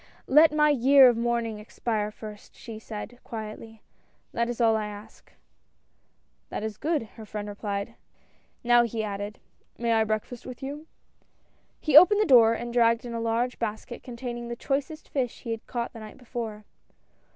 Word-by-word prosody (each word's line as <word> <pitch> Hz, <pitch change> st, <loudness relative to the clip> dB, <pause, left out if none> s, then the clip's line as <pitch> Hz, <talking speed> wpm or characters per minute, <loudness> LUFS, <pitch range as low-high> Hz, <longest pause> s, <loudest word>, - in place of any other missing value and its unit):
"Let 305 Hz, +3 st, +6 dB
my 300 Hz, 0 st, +4 dB
year 270 Hz, 0 st, +7 dB
of 240 Hz, -, +1 dB
mourning 230 Hz, -2 st, -1 dB
expire 210 Hz, 0 st, -2 dB
first," 210 Hz, -1 st, -11 dB
she 225 Hz, -3 st, -9 dB
said 220 Hz, +2 st, -8 dB
quietly, 220 Hz, -1 st, -8 dB, 0.2 s
" -, -, -41 dB
that 235 Hz, 0 st, 0 dB
is 240 Hz, -, -4 dB
all 225 Hz, -2 st, +4 dB
I 215 Hz, -1 st, -1 dB
ask." 205 Hz, 0 st, -12 dB, 1.2 s
"That -, -, -4 dB
is 220 Hz, -1 st, -4 dB
good!" 305 Hz, 0 st, 0 dB, 0.2 s
her 220 Hz, -, -8 dB
friend 210 Hz, 0 st, -5 dB
replied, 205 Hz, +1 st, -4 dB, 0.7 s
"now," 240 Hz, 0 st, +6 dB
he 230 Hz, -2 st, -2 dB
added, 205 Hz, 0 st, -5 dB, 0.2 s
" -, -, -40 dB
may 235 Hz, -1 st, +1 dB
I 220 Hz, 0 st, +4 dB
breakfast 220 Hz, +3 st, -3 dB
with 255 Hz, 0 st, -9 dB
you? 290 Hz, +4 st, -6 dB, 0.5 s
" -, -, -41 dB
He 305 Hz, -3 st, +2 dB
opened 365 Hz, +7 st, +9 dB
the 425 Hz, -, +3 dB
door, 230 Hz, -, +6 dB
and 235 Hz, +1 st, -5 dB
dragged 230 Hz, 0 st, +3 dB
in 235 Hz, -, -6 dB
a 230 Hz, -, -3 dB
large 230 Hz, +2 st, -1 dB
basket 225 Hz, +1 st, -4 dB
containing 240 Hz, -1 st, -6 dB
the 235 Hz, -, -4 dB
choicest 285 Hz, +5 st, -3 dB
fish 255 Hz, -4 st, -3 dB
he 235 Hz, -, -5 dB
had 225 Hz, -1 st, -5 dB
caught 240 Hz, -1 st, -3 dB
the 230 Hz, -, -9 dB
night 215 Hz, -1 st, -10 dB
before. 225 Hz, -4 st, -6 dB
235 Hz, 180 wpm, -27 LUFS, 220-250 Hz, 1.2 s, opened